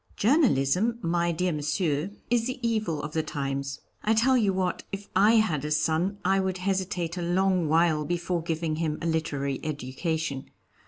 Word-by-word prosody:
_) - - -33
Journalism, 225 - +3
my 170 0 +1
dear 180 +2 0
Monsieur, 150 +2 -1 0.2
is 235 -1 +2
the 255 - -3
evil 215 -9 -1
of 150 - -4
the 160 - +1
times. 140 -2 -4 0.2
I 220 +1 +2
tell 255 +4 +4
you 215 -6 +3
what, 185 -1 -1
if 200 +1 -6
I 210 +4 +5
had 195 -11 +2
a 150 - -2
son, 160 +6 +1
I 195 +1 +3
would 190 -1 -1
hesitate 185 -2 -2
a - - -2
long 180 -1 +1
while 160 -1 +3
before 175 +2 -1
giving 160 -1 -2
him 155 -2 -1
a 165 - -5
literary 145 -4 -1
education. 150 0 -3
170 Hz, 175 wpm, -27 LUFS, 155-195 Hz, 0.2 s, I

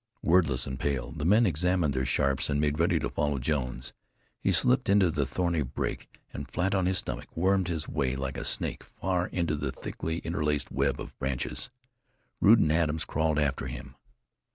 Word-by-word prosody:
Wordless 80 -8 +3
and 65 0 -5
pale, 70 -2 -1
the 75 -2 -5
men 105 +6 +5
examined 90 -3 +1
their 65 0 -1
Sharps, 70 +1 +1
and 70 - +1
made 75 0 0
ready 85 - +3
to - - -1
follow 75 -1 -1
Jones. 65 -2 -2 0.5
He - - +1
slipped 125 -2 +3
into 100 -3 +5
the 75 -3 0
thorny 85 +3 0
brake 65 -1 -3 0.2
and, - - -6
flat 95 +2 0
on 95 -2 +2
his 95 0 +1
stomach, - - -3
wormed 95 +1 +2
his 80 -3 -3
way 70 -5 -1
like 70 0 -3
a - - -4
snake - - -2
far 90 -2 -2
into 85 -4 -1
the 70 -2 -2
thickly 80 +4 -4
interlaced 75 -3 -1
web 70 -1 0
of - - -8
branches. 65 -2 -2 0.7
Rude 110 +4 +7
and 80 -8 +3
Adams 80 -1 +1
crawled 80 0 0
after 70 -3 0
him. - - -8
75 Hz, 185 wpm, -28 LUFS, 70-90 Hz, 0.7 s, Rude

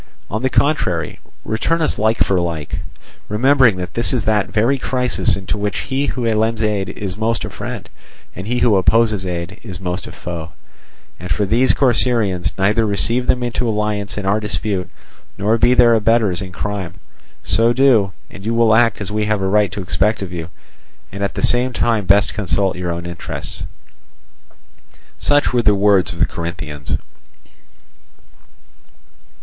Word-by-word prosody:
On 110 +3 -2
the 130 - +1
contrary, 90 - 0 0.3
return 140 +10 0
us 160 - 0
like 110 +2 +2
for 95 -2 +1
like, 85 -4 -3 0.5
remembering 130 0 +4
that 90 -1 -6
this 115 - +1
is 125 - -1
that 105 -3 +1
very 120 +6 +1
crisis 125 -6 0
in 95 - -8
which 105 +1 -1
he 135 +2 -2
who 125 - -3
lends 110 +1 0
aid 105 -2 0
is 95 -3 -5
most 110 +1 -1
a - - -7
friend, - - -6 0.5
and 95 +3 -7
he 120 +2 0
who 120 -4 +3
opposes 105 +1 +2
is 90 +2 -6
most 90 0 -4
a - - -8
foe. 85 -3 -7 0.7
And 90 0 -8
for 105 - +1
these 120 +6 +3
Corcyraeans—neither 110 -5 +2
receive 115 +4 0
them 125 -1 +2
into 120 0 -1
alliance 105 -1 -2
in 105 - -3
our 100 +2 +2
despite, 105 -3 -3 0.5
nor 110 +4 +1
be 125 +2 +4
their 120 -2 +6
abettors 110 -4 +2
in 95 -2 -6
crime. 95 -1 -4 0.5
So 115 +1 +3
do, 120 -7 +3 0.2
and 95 - -11
you 115 +2 -1
will 115 -1 +4
act 115 -2 +3
as 105 - -4
we 105 0 0
have 105 -2 0
a - - +1
right 105 -1 +2
to 100 0 -5
expect 100 +4 0
of 90 -2 -7
you, 85 -1 -5 0.6
and 100 +2 -5
at 100 - -2
the - - -3
same 125 +1 +3
time 115 -4 0
best 100 0 +4
consult 95 -2 0
your 90 -1 -4
own 85 0 -4
interests." 85 -1 -6 1.5
Such 145 -3 +2
were 120 - +3
the 105 -3 +3
words 100 -2 +3
of 85 - -8
the 85 - +3
Corinthians. 85 -4 -5
105 Hz, 165 wpm, -18 LUFS, 95-115 Hz, 1.5 s, their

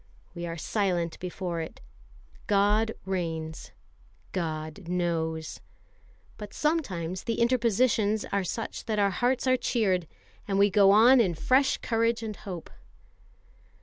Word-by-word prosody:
We 170 -1 -5
are 165 0 -5
silent 175 -2 -1
before 180 -2 -4
it. 160 - -8 0.7
God 210 +2 +2
reigns; 165 -4 -4 0.6
God 160 +1 -4
knows. 165 -3 -2 0.8
But 210 -1 -8
sometimes 185 - -1
the 230 -2 -2
interpositions 230 -3 +2
are 200 -1 +1
such 225 +5 -5
that 220 -2 -1
our 200 -1 +3
hearts 250 +7 0
are 255 0 +3
cheered, 190 -10 0 0.4
and 195 -1 0
we 200 0 +4
go 200 0 +6
on 235 +6 +7
in 180 -6 +1
fresh 260 - +2
courage 230 0 0
and 215 -2 -4
hope. 180 -5 -8
200 Hz, 125 wpm, -28 LUFS, 170-225 Hz, 0.8 s, on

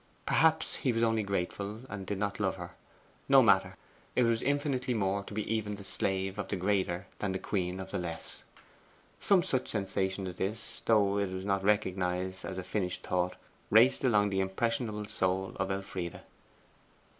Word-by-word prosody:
Perhaps 160 0 +3
he 130 - +1
was 115 0 +1
only 115 -1 +3
grateful, 100 +2 -3
and 100 -5 -6
did 100 - -2
not 100 +1 -2
love 95 -2 +1
her. 90 -1 -7 0.6
No - - +8
matter: - - +4 0.4
it 125 - +4
was 115 -1 +2
infinitely 135 -3 0
more 100 -1 0
to - - -9
be 105 - -2
even 105 -1 -1
the 100 - -10
slave 95 +1 -1
of 105 - -2
the - - -1
greater 95 -1 0
than 100 -2 -1
the - - 0
queen 95 -1 -2
of 95 0 -7
the - - -1
less. 85 -2 -5 0.8
Some 190 -3 +4
such 130 -8 -1
sensation 95 -2 -1
as 90 -1 -6
this, 105 +3 -4
though 100 -3 +4
it 100 -2 0
was 95 +1 -5
not 100 -1 +1
recognized 95 -2 0
as 95 - -5
a 95 - -3
finished 90 -2 -2
thought, 90 0 0 0.3
raced 115 +6 +5
along 105 -5 +3
the 95 - +1
impressionable 105 +2 -1
soul 95 -2 -1
of 95 0 -1
Elfride. 95 -3 -4
100 Hz, 180 wpm, -31 LUFS, 95-110 Hz, 0.8 s, No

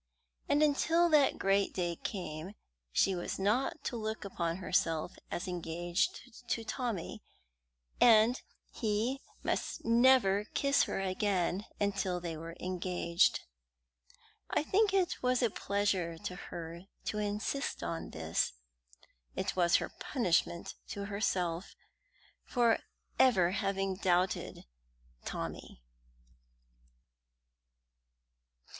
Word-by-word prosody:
And 290 +1 +4
until 325 +4 +3
that 300 -3 +4
great 195 +1 +2
day 175 -2 -1
came 180 -1 -5 0.4
she 195 - +3
was 175 -1 -3
not 240 - 0
to - - -3
look 220 -1 -3
upon 170 -3 -2
herself 165 -3 0 0.2
as 175 - -3
engaged 175 +2 -1 0.2
to 230 -1 -1
Tommy, 225 -6 -3 0.8
and 230 +1 +6 0.3
he 225 +5 -1 0.2
must - - -2
never 230 -4 +5
kiss 280 0 +3
her - - -3
again 190 0 0
until 195 -3 0
they 170 -2 -4
were 165 +1 -7
engaged. 180 -1 +1 1.1
I - - +1
think 405 +5 +3
it 380 -2 +1
was 250 0 +2
a 235 - +2
pleasure 195 -5 0
to 180 - -5
her 170 0 -8 0.2
to 210 - -2
insist 210 +7 -2
on 165 - -3
this. - - -1 0.8
It - - -2
was 175 -1 +4
her - - +1
punishment 175 - 0
to 200 0 -5
herself 190 -3 -1 0.7
for 235 -2 +2 0.4
ever 190 -9 +5
having 195 -1 -1
doubted 185 -1 0 0.6
Tommy. - - -6
195 Hz, 105 wpm, -32 LUFS, 175-235 Hz, 1.1 s, and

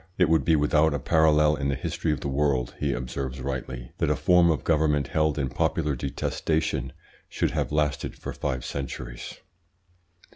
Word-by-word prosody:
"It 90 -4 +4
would 80 -1 +3
be 80 - +3
without 75 +1 +3
a - - -1
parallel 75 +1 +4
in 70 - -1
the 70 - 0
history 85 +3 -2
of 75 - -2
the - - -3
world," 70 -3 0
he 70 -1 0
observes 65 +1 -4
rightly, 65 -2 -5
"that - - +1
a - - +2
form 90 -1 +4
of 75 -6 0
government 75 -4 +2
held 75 -1 +1
in 70 -3 -1
popular 75 +3 0
detestation 70 0 -2 0.4
should - - -1
have - - -2
lasted 75 -1 -1
for - - -7
five 65 -1 -3
centuries. 65 -3 -6
75 Hz, 175 wpm, -26 LUFS, 65-80 Hz, 0.4 s, It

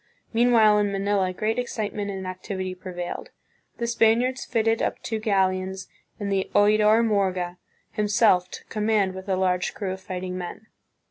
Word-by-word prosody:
Meanwhile 225 -3 +5
in 205 -1 +1
Manila 195 -1 0
great 215 +5 -1
excitement 215 -4 -3
and 190 -1 -5
activity 185 0 -4
prevailed. 180 -1 -6 0.5
The 235 - -2
Spaniards 235 +2 +2
fitted 225 -1 +1
up - - -1
two 220 -1 -2
galleons 190 -2 0 0.3
and 200 -1 -3
the 195 -1 0
Oidor 215 +2 +5
Morga 185 -4 0 0.3
himself 210 -4 +3
took - - -10
com 215 -1 -2
mand 205 -4 +2
with 190 +1 -8
a 190 - +2
large 180 -1 0
crew 195 -3 -3
of 190 - -9
fighting 185 -1 -5
men. 180 +4 -7
200 Hz, 155 wpm, -25 LUFS, 185-220 Hz, 0.5 s, Meanwhile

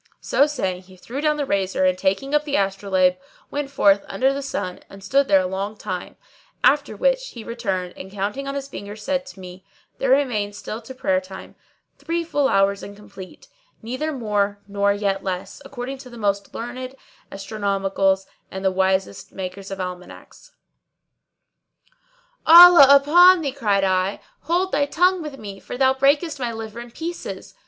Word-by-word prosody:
So 285 - +2
saying, 190 -11 -3
he 185 0 -18
threw 245 +9 -6
down 300 0 +1
the 290 - -1
razor 190 -4 0
and 185 0 +3
taking 195 +9 -1
up 295 0 +3
the 290 -1 -3
astrolabe, 195 -2 +1 0.3
went 290 -1 -3
forth 200 -7 +3
under 260 +7 +1
the 280 - -4
sun 200 -9 -4
and 195 0 -13
stood 275 +7 +2
there 195 -1 +5
a - - -3
long 195 +3 -4
time; 180 -3 -6 0.5
after - - +3
which - - +1
he 235 - -10
returned 195 -7 -3
and 190 - -10
counting 205 +8 -4
on 275 - -4
his 275 -1 -4
fingers 210 -4 -9
said 270 +2 -2
to 205 - -12
me, 185 0 -11 0.4
"There 270 - 0
remain 245 -7 +1
still 215 +2 -7
to 260 +3 -11
prayer 185 -7 0
time 190 +1 -11 0.5
three 335 +1 -2
full 290 -4 0
hours 195 0 +2
and 200 - -9
complete, 195 -2 -13 0.4
neither 255 +7 -3
more 210 -6 -1
nor 200 0 +1
yet 200 -1 -1
less, 185 -1 -5
according 265 +1 -7
to 260 - -11
the 240 - -12
most 200 -2 -1
learned 255 +3 -6 0.4
astronomicals 195 -1 -1 0.2
and 190 0 -6
the 190 - +3
wisest 190 0 -1
makers 190 +1 -7
of 195 -1 -6
almanacks." 180 - -9 1.9
"Allah 340 -3 +10
upon 335 +6 +7
thee," 280 -3 -2
cried 210 -7 0
I, 185 +1 0 0.2
"hold 360 +4 -1
thy 285 0 +1
tongue 360 +4 +2
with 300 -3 -7
me, 200 -4 -9
for - - -8
thou 265 0 +4
breakest 285 +3 +1
my 245 -2 -2
liver 225 0 -7
in 240 0 -9
pieces." 330 +8 -7
215 Hz, 175 wpm, -22 LUFS, 195-275 Hz, 1.9 s, Allah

